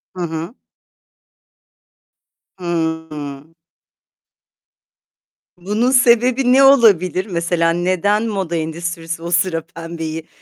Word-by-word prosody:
Hı 180 - -6
hı. 165 +5 -5 2.0
Hı 160 -2 -2
hı. 145 +1 -8 2.0
Bunun 210 +8 0
sebebi 250 0 +3
ne 275 - +6
olabilir? 200 -9 +4
Mesela 170 -3 0
neden 185 +5 0
moda 190 -5 -3
endüstrisi 165 +1 -4
o 170 - -5
sıra 175 -1 +1
pembeyi, 165 -1 -7
175 Hz, 85 wpm, -18 LUFS, 165-210 Hz, 2.0 s, ne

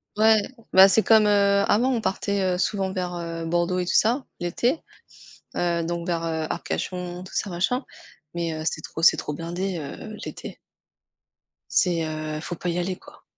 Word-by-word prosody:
Ouais. 220 0 +5 0.3
Bah, 190 +1 +10
c'est 220 - +4
comme, 220 -1 +5
heu, 200 -1 +4
avant 240 +5 +3
on 245 - +1
partait, 200 -1 -1
heu, 180 - -1
souvent 195 -1 0
vers, 180 -2 -3
heu, 165 -1 -5
Bordeaux 175 +2 0
et 180 - -1
tout - - 0
ça 245 +5 +3 0.2
l'été, 240 - 0 0.8
heu, 170 -1 +1
donc 170 +1 -3
vers, 170 -2 -1
heu, 160 -1 -2
Arcachon, 180 -1 -4
tout - - -13
ça, 205 - -1
machin 190 +10 0 0.5
mais 170 -1 -2
heu, 155 0 -5
c'est 155 - -1
trop 160 - -7
c'est 165 - +6
trop 150 - -4
blindé, 175 +4 -3
heu, 165 +8 -7
l'été. - - -8 1.1
C'est, 175 -3 +2
heu, 155 -1 -4
faut 175 - -5
pas 180 - -6
y 170 - -1
aller, 180 +1 -2
quoi. - - -17
180 Hz, 185 wpm, -24 LUFS, 170-200 Hz, 1.1 s, Bah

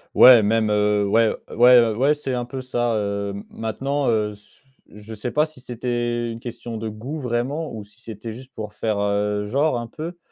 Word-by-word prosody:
Ouais, 125 -3 +9
même, 110 +1 +1
heu, 105 -1 +2
ouais. 110 +2 +3 0.2
Ouais, 120 -1 +7
ouais 140 +7 +2
c'est 135 -3 -4
un 120 -1 -2
peu 130 +1 -6
ça, 120 -2 -1
heu. 100 -1 -2 0.2
Maintenant, 135 +5 -2
heu, 105 -2 +1
s 105 0 -18 0.3
je 105 +2 -11
sais 110 +4 -4
pas 150 +4 +2
si 155 -5 -14
c'était 120 -1 -2
une 115 - -7
question 120 -1 -7
de 110 0 -4
goût 125 +9 -6
vraiment 130 +6 -2
ou 110 -2 -7
si 105 +3 -19
c'était 110 0 -7
juste 130 +3 -12
pour 105 -1 -6
faire, 105 0 -1
heu, 105 0 0
genre 135 +4 +1
un 120 - -4
peu 165 +8 -7
115 Hz, 200 wpm, -22 LUFS, 105-125 Hz, 0.3 s, Ouais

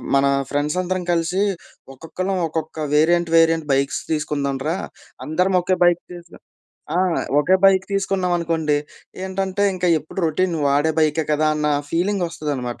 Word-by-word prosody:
మన 140 0 +4 0.3
ఫ్రెండ్సందరం 180 +6 -1
కలిసి 170 +3 0 0.5
ఒక్కొక్కళ్ళం 185 +6 -4
ఒక్కొక్క 160 0 -5 0.2
వేరియంట్, 170 +2 +3
వేరియంట్ 165 -1 +3
బైక్స్ 140 +1 0
తీసుకుందాంరా 150 0 -1 0.5
అందరం 180 +5 +1
ఒకే 185 +1 0
బైక్ 175 0 +3
తీసు 175 0 -12 0.6
ఆ! - - +1 0.4
ఒకే 185 +6 +4
బైక్ 190 -1 +5
తీసుకున్నామనుకోండి 175 -6 0 0.5
ఏంటంటే, 190 +1 -2
ఇంకా 180 -1 0
ఎప్పుడు 155 +5 -11
రొటీన్ 170 +3 0
వాడే 145 +3 +2
బైకే 155 0 +2
కదా 155 +1 +2
అన్న 150 0 -1 0.2
ఫీలింగ్ 185 +3 0
ఒస్తదనమాట. 145 -7 -4
165 Hz, 125 wpm, -21 LUFS, 150-185 Hz, 0.6 s, బైక్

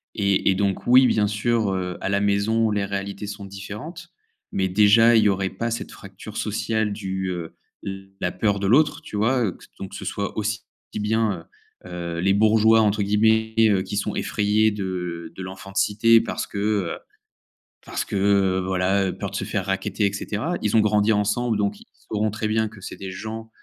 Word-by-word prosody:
et 100 -2 +2
et 95 - +3
donc 100 0 -1
oui 130 +2 +7
bien 105 -1 +2
sûr, 105 -1 0
heu, 90 -1 -3
à - - -2
la 100 0 +1
maison 105 +2 +2
les 105 -1 0
réalités 100 +1 -4
sont 100 -1 -7
différentes, 105 - -8 0.4
mais 95 -1 0
déjà, 110 +4 +6
il 110 - +5
y 105 - +4
aurait 95 -1 0
pas 115 +5 -3
cette 115 - -4
fracture 100 +2 -11
sociale 110 0 -1
du, 95 -2 -3
heu, 85 -2 -6 0.6
la 90 - -1
peur 100 -2 0
de 100 - -1
l'autre 145 +8 +3
tu 160 - -9
vois? 120 +4 +2
Heu, 95 - -1
que - - -18
ce - - -17
donc 95 0 -7
ce - - -7
soit 100 0 -4
aussi 110 +1 -1 0.4
bien, 105 -2 0
heu 85 - -14 0.5
heu, 85 -1 -5
«les 95 +2 +3
bourgeois», 110 +2 +5
entre 105 -1 +2
guillemets, 110 +2 +2 0.2
heu, 95 -3 +2
qui 100 - -5
sont 105 0 -2
effrayés 105 +1 +1
de 90 -4 -4
de 95 - -7
l'enfant 95 +1 -9
de - - -8
cité, 115 +2 +4
parce - - -4
que, - - -8
heu, 100 -4 0 0.9
parce - - -4
que 100 -1 +2
voilà, 95 +1 +1
peur 100 -1 -5
de - - -7
se - - -2
faire 95 -3 -2
racketter 100 +2 -1
et 100 - 0
cetera. 125 - -3
Ils 105 +1 +2
ont - - +6
grandi 105 0 +3
ensemble 105 +2 0
donc 100 -1 -1
ils - - -16 0.3
sauront 110 0 +1
très 110 +1 -3
bien 110 0 +1
que 105 -1 -14
c'est - - -7
des 95 - -6
gens, 110 +3 -7
105 Hz, 205 wpm, -23 LUFS, 95-110 Hz, 0.9 s, oui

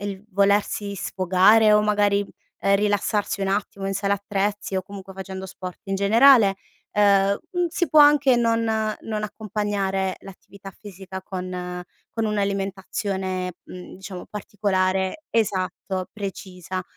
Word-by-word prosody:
il 200 -1 -5
volersi 200 0 +1
sfogare 190 +4 +4
o 210 - +6
magari, 205 -1 +2 0.4
ehm, 200 0 +3
rilassarsi 205 0 0
un 195 - 0
attimo 200 0 -2
in 195 - -2
sala 200 +1 0
attrezzi 200 0 -2
o 185 - -1
comunque 195 0 -10
facendo 190 0 -7
sport 185 -1 -8
in 195 0 -2
generale, 215 0 +5 0.3
ehm, 200 -1 +3
mhmm, 355 -2 0
si 350 0 -1
può 305 +2 +6
anche 290 -3 +6
non 230 -1 +2 0.4
non 215 -1 -4
accompagnare 200 -2 -2
l'attività 195 0 -12
fisica 190 -1 -10
con 180 -1 -5 0.4
con 225 - +2
un'alimentazione, 195 -2 -2
mhmm, 180 0 -11
diciamo 190 -1 -9
particolare 190 +2 -1
esatto 190 -3 -1
precisa. 185 -3 -6
200 Hz, 125 wpm, -23 LUFS, 190-210 Hz, 0.4 s, o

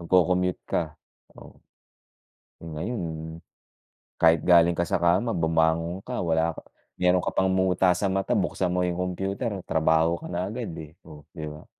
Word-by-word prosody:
Magko-commute 90 +1 +2
ka, 80 -3 -2 0.4
oh, - - -14 1.0
ngayon. 80 -1 -5 0.8
Kahit 80 -1 +6
galing 85 -1 +5
ka 85 - +1
sa 85 - 0
kama 95 +7 +2
bumangon 80 +2 +1
ka, 125 - -3
wala 80 -1 +1
ka - - -9 0.4
meron 90 0 +3
ka - - -2
pang 95 0 +2
muta 95 0 +2
sa 100 - -1
mata 95 0 0
buksan 90 -2 -1
mo 90 0 0
yung 90 - -1 0.2
computer, 95 +6 -3 0.2
trabaho 80 +1 +2
ka - - -8
na 90 +1 -2
agad, 115 +2 -5
eh, 80 0 -9
oh, 75 -3 -14
'di 80 -3 -6
ba. 75 +1 -11
85 Hz, 160 wpm, -26 LUFS, 80-95 Hz, 1.0 s, Kahit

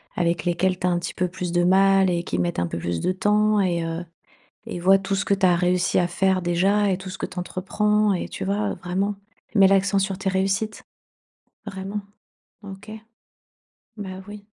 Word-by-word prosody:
avec 170 -1 0
lesquelles 180 +1 +1
tu 180 - 0
as - - +3
un 175 - +1
petit 175 - -5
peu 180 - -1
plus 180 0 -5
de 175 0 +2
mal 195 +1 +4
et 170 -1 -1
qui 90 - -3
mettent 85 0 -1
un 85 - 0
peu 85 - -5
plus 85 0 -3
de - - +1
temps 210 +2 +2
et 175 -3 +1
heu 165 +1 -4 0.6
et - - -5
vois 190 +2 +5
tout 195 0 -3
ce 195 +1 -1
que - - 0
tu 195 -1 +2
as 180 - +4
réussi 180 +1 +1
à 175 - +2
faire 190 +1 +1
déjà 195 +4 +2
et 185 - 0
tout 190 0 -9
ce 185 - -7
que - - -3
tu 180 -1 -10
entreprends 210 +3 0
et 180 - -3
tu - - -6
vois, 200 +1 -1
vraiment, 195 +3 -2 0.4
mets 200 -3 +6
l'accent 195 0 +3
sur 195 -1 -1
tes 195 0 -2
réussites, 195 +3 -1 0.8
vraiment, 195 0 -5 0.6
OK? 200 +1 -10 1.1
Bah, 190 -3 -7
oui. 205 0 -10
190 Hz, 205 wpm, -23 LUFS, 175-200 Hz, 1.1 s, mets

